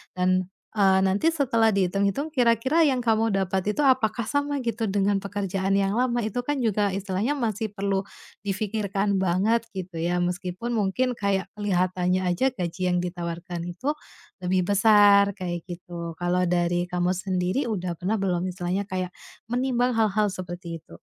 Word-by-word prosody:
Dan, 185 0 +1 0.2
eee, 195 -2 +4
nanti 200 +12 +2
setelah 230 -7 +2
dihitung-hitung 200 - +1
kira-kira 250 +4 +3
yang 260 -2 +1
kamu 225 -1 +2
dapat 190 +1 0
itu - - -1
apakah 250 -3 +3
sama 285 +1 0
gitu 230 -1 -1
dengan 200 0 +2
pekerjaan 195 -1 -1
yang 195 0 +1
lama 245 -1 +1
itu 220 +3 -2
kan 290 +1 0
juga 210 -2 +1
istilahnya 195 +6 -1
masih 220 -3 -2
perlu 195 -1 0 0.4
dipikirkan 200 0 -1
banget 200 +6 +2
gitu 185 -2 -6
ya. 175 +1 0
Meskipun 180 +5 -3
mungkin 220 +5 +1
kayak 200 -1 0
kelihatannya 185 -2 +1
aja 180 +10 +2
gaji 180 -4 -4
yang 180 - +2
ditawarkan 175 -1 -5
itu 260 - -2 0.5
lebih 185 +1 +2
besar 205 -1 +6
kayak 175 -2 -4
gitu. 170 -1 -7
Kalau 180 +1 +1
dari 175 0 +1
kamu 180 0 0
sendiri 185 +7 -1
udah 180 -5 -2
pernah 200 +5 0
belum 180 -2 0
istilahnya 180 +2 -2
kayak 185 -1 -2 0.4
menimbang 250 0 +1
hal-hal 215 -1 +2
seperti 175 -2 -6
itu? 85 - -15
195 Hz, 150 wpm, -25 LUFS, 180-220 Hz, 0.5 s, besar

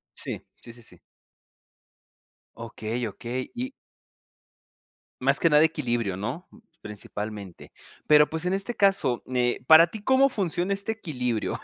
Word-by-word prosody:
Sí. - - -4 0.2
Sí, 115 - -11
sí, 120 - -14
sí. 115 - -11 1.6
Okey, 115 +2 -4
okey, 120 +5 -6
y 255 +3 -4 1.5
más - - +2
que 165 - +3
nada 150 0 +6
equilibrio, 120 - -1
¿no?, 125 - -5 0.3
principalmente. 105 -2 -8 0.3
Pero, 150 -1 +6
pues, 160 +2 -4
en 180 - 0
este 200 +5 -3
caso, 195 - +2
eh, 125 -1 0
¿para 160 +4 +8
ti 205 +4 -9
cómo 265 +3 +4
funciona 185 -5 -2
este 200 +3 -2
equilibrio? 125 - -3
150 Hz, 130 wpm, -26 LUFS, 115-190 Hz, 1.6 s, para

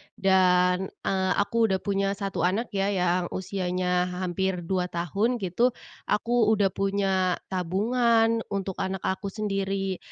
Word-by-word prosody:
dan, 180 -1 +3 0.2
eee, 190 -1 0
aku 230 +2 +1
udah 190 -2 0
punya 195 -1 0
1 195 -4 -2
anak 215 +6 0
ya, 195 0 0
yang 180 -1 +1
usianya 180 -1 -1
hampir 185 0 -2
2 180 +1 -1
tahun 195 +8 0
gitu. 210 +7 +1 0.3
Aku 230 +1 +2
udah 200 -2 +2
punya 195 -2 +1 0.2
tabungan 225 +5 +2
untuk 195 -1 -3
anak 190 -1 -2
aku 190 +2 -2
sendiri. 195 -3 -2
190 Hz, 130 wpm, -26 LUFS, 180-200 Hz, 0.3 s, dan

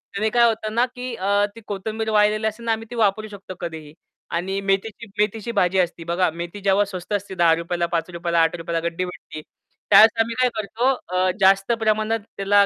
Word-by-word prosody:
त्याने 215 +2 +1
काय 235 +1 +4
होतं 220 -1 -2
ना 240 +1 +4
की 250 0 -5
अ, 200 0 +1
ती 230 - -11
कोथिंबीर 220 +3 -3
वाळलेली 215 +1 +3
असेल 220 +2 -5
ना 230 - +1
आम्ही 225 0 -2
ती 240 - -7
वापरू 215 -1 +1
शकतो 195 -3 -10
कधीही. 160 -3 -7 0.4
आणि 190 +3 -2
मेथीची 195 +3 -1
मेथीची 210 +2 0
भाजी 185 -4 +2
असती 175 -2 -1
बघा. 175 +2 +1
मेथी 170 +4 -7
जेव्हा 195 +1 +3
स्वस्त 185 0 -7
असते 200 -1 -3
₹10, 170 0 +2
ला 170 - +1
₹5, 170 0 -3
ला 170 - +3
₹8 165 +1 -1
ला 165 - +1
गड्डी 170 +2 -3
भेटते. 180 -3 -9 0.5
त्यावेळेस 220 +1 +8
आम्ही 230 +1 -2
काय 250 - +4
करतो 220 +4 0 0.3
अ, 185 0 +3
जास्त 195 +2 +4
प्रमाणात 220 0 +1 0.2
त्याला 200 +1 +4
200 Hz, 200 wpm, -22 LUFS, 175-220 Hz, 0.5 s, त्यावेळेस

